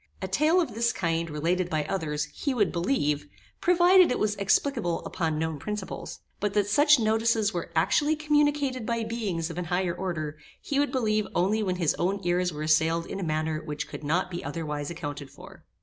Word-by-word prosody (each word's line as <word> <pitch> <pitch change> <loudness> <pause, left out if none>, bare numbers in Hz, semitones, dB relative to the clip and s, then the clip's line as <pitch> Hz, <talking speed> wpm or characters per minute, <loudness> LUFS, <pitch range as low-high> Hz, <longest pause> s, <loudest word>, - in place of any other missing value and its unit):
A 190 - -4
tale 305 - +3
of 320 -10 -1
this 235 +2 +1
kind, 165 -2 -1
related 170 +4 0
by 155 -3 -1
others, 155 -4 -2
he 280 -3 -2
would 210 -5 +2
believe, 150 - 0 0.3
provided 360 +1 +5
it - - +1
was 210 -1 +1
explicable 200 -2 +1
upon 160 -3 -2
known 160 -1 -2
principles; 210 +5 -6 0.2
but 205 0 -2
that 205 -1 +3
such 295 +7 +5
notices 220 -1 +2
were 175 - -4
actually 290 - +3
communicated 295 -4 +1
by 230 +1 -1
beings 200 -8 -3
of 170 - -5
an 180 - -3
higher 180 0 0
order, 155 -5 -4 0.2
he 280 - -1
would 290 - +1
believe 215 -5 +1
only 205 +5 +2
when 185 -3 0
his 170 -5 +1
own 195 +3 0
ears 180 0 +1
were 150 -1 -5
assailed 160 +2 +2
in - - -6
a - - -3
manner 155 -1 -1
which 150 -2 -4
could - - -8
not 175 +5 0
be 175 - -5
otherwise 150 -3 -4
accounted 145 -4 -6
for. 140 - -14
185 Hz, 195 wpm, -27 LUFS, 160-230 Hz, 0.3 s, provided